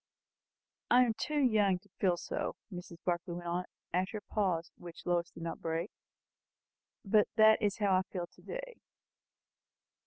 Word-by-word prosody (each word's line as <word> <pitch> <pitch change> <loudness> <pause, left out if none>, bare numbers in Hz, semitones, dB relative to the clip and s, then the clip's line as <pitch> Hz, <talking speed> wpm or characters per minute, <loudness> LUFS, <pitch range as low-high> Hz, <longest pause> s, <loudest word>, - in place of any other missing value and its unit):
I 250 +1 +7
am 235 -3 +1
too 295 +7 -2
young 215 -8 +4
to 205 +3 -22
feel 180 -3 +3
so," - - -3 0.2
Mrs. 175 -1 -8
Barclay 175 0 -1
went 175 0 -6
on, 175 +1 -1 0.3
after 185 +4 0
a 205 - -12
pause 180 -6 +1
which 170 -1 -10
Lois 175 -1 +1
did 165 - -10
not 165 - -4
break; 165 +4 -2 1.1
"but 210 +1 +4
that 220 -1 +7
is 205 -2 +1
how 200 -3 +3
I - - +3
feel 180 -3 -2
to - - -22
day." - - -6
185 Hz, 160 wpm, -33 LUFS, 175-215 Hz, 1.1 s, I